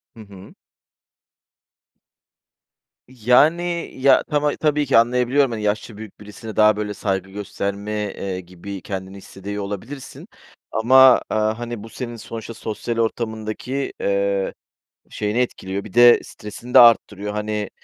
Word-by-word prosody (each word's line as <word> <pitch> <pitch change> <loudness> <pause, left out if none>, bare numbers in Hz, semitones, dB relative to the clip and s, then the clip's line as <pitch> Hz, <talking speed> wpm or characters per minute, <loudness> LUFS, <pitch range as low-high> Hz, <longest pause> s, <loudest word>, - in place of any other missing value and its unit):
Hı - - -15
hı. 100 -2 -14 2.5
Yani, 155 +9 +2
ya, 135 +1 +4
tama 150 -1 0
tabii 150 -1 +1
ki 135 - +3
anlayabiliyorum, 125 +3 +3
hani, 110 -2 -4
yaşça 105 +1 -2
büyük 110 -2 -11
birisine 105 +1 -10
daha, 105 0 +5
böyle, 105 -1 -3
saygı 95 -2 -2
gösterme, 100 +1 -5
eee, 100 -3 -4
gibi 95 +2 -9
kendini 95 -1 -6
hissediyor 100 +1 -7
olabilirsin 115 +8 -8 0.4
ama, 130 +3 +6
aaa, 110 +1 0
hani, 120 -3 -6
bu 115 - -10
senin 120 0 -6
sonuçta 115 0 -8
sosyal 115 +1 -5
ortamındaki, 115 +3 -3
eee, 100 0 0 0.6
şeyini 105 +3 -2
etkiliyor. 100 -5 -3
Bir 105 - -12
de 120 0 +7
stresini 105 +4 -10
de - - +9
arttırıyor. 105 -3 +4
Hani, 105 -1 -3
110 Hz, 130 wpm, -21 LUFS, 100-120 Hz, 2.5 s, de